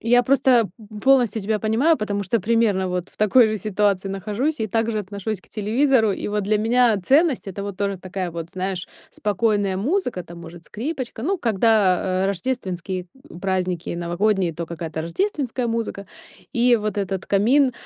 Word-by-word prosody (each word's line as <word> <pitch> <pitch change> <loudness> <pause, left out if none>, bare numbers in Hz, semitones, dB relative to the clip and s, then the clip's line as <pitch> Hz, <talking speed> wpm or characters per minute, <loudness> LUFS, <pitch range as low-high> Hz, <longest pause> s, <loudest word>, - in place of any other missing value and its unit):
Я 245 +2 +4
просто, 250 -3 +3
п 210 -1 -11
полностью 250 -5 +4
тебя 215 +1 0
понимаю. 235 +10 +2
Потому 205 -3 -2
что 210 +3 0
примерно 205 -3 +2
вот 180 0 -3
в - - -23
такой 215 +3 +5
же 215 - -1
ситуации 200 -1 0
нахожусь 210 +10 -2
и 220 - 0
также 225 +1 0
отношусь 200 0 -4
к - - -24
телевизору. 225 +1 +2
И - - -4
вот 210 0 -1
для 210 +1 +2
меня 235 +1 +3
ценность- 280 - +2
это 195 +1 -5
вот 200 -2 -5
тоже 200 -1 -2
такая 185 -1 -4
вот, 165 0 -6
знаешь, 185 -1 -3 0.2
спокойная 205 -1 0
музыка, 250 - -1
там 170 0 -12
может 170 0 -11
скрипочка. 255 -1 -5
Ну, 375 +8 0
когда, 195 - +2
э, - - +2
рождественские 185 -3 -3 0.3
праздники 185 -3 -1
и - - -3
новогодние, 175 +1 0
то 170 0 -5
какая-то 160 -1 -5
рождественская 260 - -2
музыка. 225 -4 -3 0.5
И 240 0 +4
вот 210 -2 -3
этот 195 -1 -3
камин, 250 +7 +3
210 Hz, 170 wpm, -22 LUFS, 185-235 Hz, 0.5 s, такой